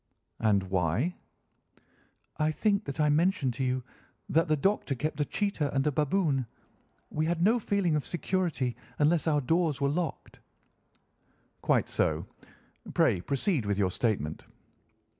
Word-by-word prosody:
"And 105 -3 +3
why?" 95 - 0 1.2
"I 155 0 +2
think 205 +6 +1
that 140 - -6
I 150 -1 +4
mentioned 150 -4 +2
to 130 - -3
you 130 0 0 0.5
that 165 +3 +3
the 155 - +3
Doctor 190 -4 +1
kept 150 +3 -2
a - - +2
cheetah 185 -9 -1
and 135 - +2
a 150 - +3
baboon. 145 -3 +1 0.6
We 155 +1 0
had 170 0 0
no 225 +5 +4
feeling 200 -7 +1
of 150 - 0
security 175 -8 -1 0.2
unless 155 +2 +2
our 150 -2 +3
doors 160 +1 +1
were 140 - +2
locked." 165 +3 -3 1.2
"Quite - - +2
so. - - 0 0.7
Pray 85 - +3
proceed 140 - 0
with 100 -1 0
your 95 -3 +1
statement." 90 -9 -1
150 Hz, 140 wpm, -29 LUFS, 130-175 Hz, 1.2 s, I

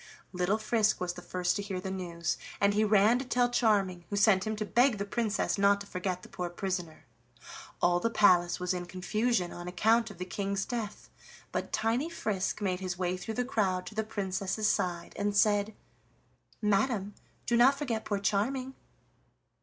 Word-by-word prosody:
Little 180 +3 +1
Frisk 215 0 +1
was 180 -1 -2
the 180 - -9
first 180 0 -1
to - - -2
hear 200 -2 -4
the 190 +1 -5
news, 170 -3 -3 0.2
and 200 0 +3
he 210 +1 +2
ran 215 +3 +4
to 265 - -4
tell 245 0 +1
Charming, 195 -7 +1
who 205 - -2
sent 200 -1 +4
him 215 - -1
to 215 0 -3
beg 245 +2 +3
the 200 - -3
Princess 210 -1 -1
not 200 0 +4
to - - -7
forget 185 -1 -3
the - - -10
poor 180 -1 -4
prisoner. 175 -2 -4 0.8
All 175 0 +4
the 230 - 0
palace 185 -6 +4
was 180 0 -1
in 175 -1 -4
confusion 195 +1 -1
on 175 0 -8
account 225 +6 +2
of 205 - -11
the 180 - -4
King's 195 +1 -2
death, 230 -4 -5 0.4
but - - -3
tiny 235 +8 0
Frisk 210 - -2
made 185 -3 0
his 185 -2 -4
way 180 0 -1
through 200 +5 -6
the 250 - 0
crowd 195 -8 0
to 195 - -8
the 220 +1 -1
Princess's 200 0 -2
side, 175 -4 -1
and 205 0 0
said: 205 0 +3 0.9
"Madam, 210 0 +1 0.3
do 240 - +1
not 260 +4 +5
forget 240 -7 -2
poor 205 - -1
Charming." 225 +7 -1
200 Hz, 185 wpm, -30 LUFS, 185-220 Hz, 0.9 s, not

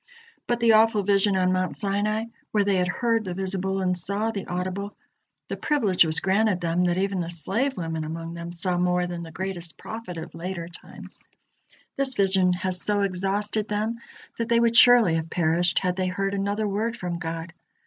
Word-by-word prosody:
But 240 -1 0
the 230 -1 +5
awful 220 -1 +4
vision 200 0 +2
on 185 0 +2
Mount 185 0 -1
Sinai, 210 +2 -1 0.2
where 210 -1 +2
they 195 -2 +2
heard 225 +5 0
the 180 -3 -5
visible 190 0 -1
and 180 -1 +1
saw 200 +5 -1
the 200 -3 -5
audible 185 +3 -4 0.5
the - - -3
privilege 220 - +3
was 155 0 +3
granted 195 0 +2
them 175 +1 0
that 175 0 +1
even 195 0 0
the 170 -1 -3
slave 200 - -1
women 165 -2 -3
among 165 +1 -6
them 170 0 -7
saw 175 +1 -1
more 180 0 +1
than 175 -1 -5
the 165 -1 -8
greatest 175 -2 -5
prophet 220 -6 -7
of 160 - -7
later 170 0 -5
times 175 - -12 0.8
this 270 -2 +1
vision 190 -3 +3
has 180 0 -1
so 205 -1 +1
exhausted 200 +3 -1
them 215 +3 -2 0.4
that 230 - -2
they 235 0 +4
would 235 0 +2
surely 240 -7 +7
have 160 0 -4
perished, 170 +1 +1
had 180 -2 +1
they 185 -1 0
heard 195 +2 -2
another 200 +2 -1
word 220 +4 -2
from 175 -3 -4
God. 165 0 -5
190 Hz, 190 wpm, -25 LUFS, 175-210 Hz, 0.8 s, surely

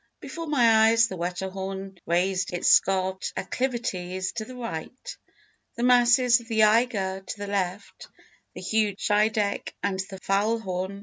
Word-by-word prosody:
Before 310 +4 -7
my 230 -6 +4
eyes 230 +1 +4
the 190 - -5
Wetterhorn 190 +2 -5
raised 180 +2 0
its 175 - +1
scarped 190 0 +2
acclivities; 185 -8 -3
to 220 - -3
the 255 - -11
right, 230 -1 -7 0.6
the 235 - -3
masses 245 0 +5
of 235 - -15
the 220 -2 +2
Eiger, 210 -4 +2
to 190 - -7
the 205 - -5
left, 200 -1 -4 0.5
the - - -8
huge 215 -3 0
Scheideck 210 0 0
and 195 -2 -1
the 190 - -8
Faulhorn. 195 -2 -1
205 Hz, 140 wpm, -25 LUFS, 190-230 Hz, 0.6 s, masses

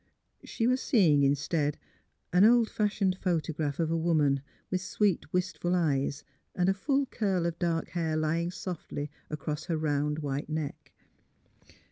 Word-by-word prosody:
She 225 - -2
was 255 +2 +2
seeing, 165 - +4
instead, 145 +2 +1 0.6
an 180 +2 +6
old 230 +1 +5
fashioned 205 -3 +1
photo 165 -3 0
graph 150 -1 -2
of 165 -1 +1
a - - +2
woman, 155 -5 +2 0.3
with 185 -1 0
sweet, 195 -4 0
wistful 180 -1 0
eyes, 145 -4 0 0.3
and 180 0 +1
a 195 - +4
full 275 +8 +1
curl 195 -8 -1
of 170 -1 -2
dark 165 -2 0
hair 160 -3 -1
lying 165 +2 0
softly 170 -5 -5 0.2
across 150 0 -4
her 165 -3 -1
round 150 -1 0
white 145 -1 -3
neck. 155 -2 -4
165 Hz, 150 wpm, -29 LUFS, 150-185 Hz, 0.6 s, an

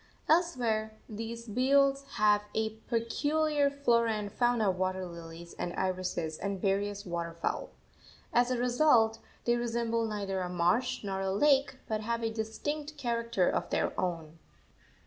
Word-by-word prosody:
Elsewhere 235 -10 +1
these 230 +2 -6
beels 275 +4 +3
have 210 -1 +4
a 220 0 -1
peculiar 290 +5 +1
flora 235 -5 +2
and 210 -1 -4
fauna 240 -3 +2
of - - -5
water 185 0 -1
lilies 170 0 -9
and 175 - -2
irises 185 -4 -2
and 200 -1 -3
various 200 +1 0
water 170 -2 -3
fowl. 170 - -2 0.6
As 245 +1 +4
a 255 - 0
result, 240 -3 +4 0.3
they 240 - +3
resemble 230 -1 0
neither 200 -3 -2
a 180 - -3
marsh 180 +10 +1
nor 195 -1 -2
a 190 0 0
lake, 275 +5 +3
but 215 -1 -1
have 230 +1 -2
a 225 0 -1
distinct 290 +8 -4
character 235 -7 0
of - - 0
their - - 0
own. 165 -3 -3
220 Hz, 145 wpm, -31 LUFS, 190-245 Hz, 0.6 s, have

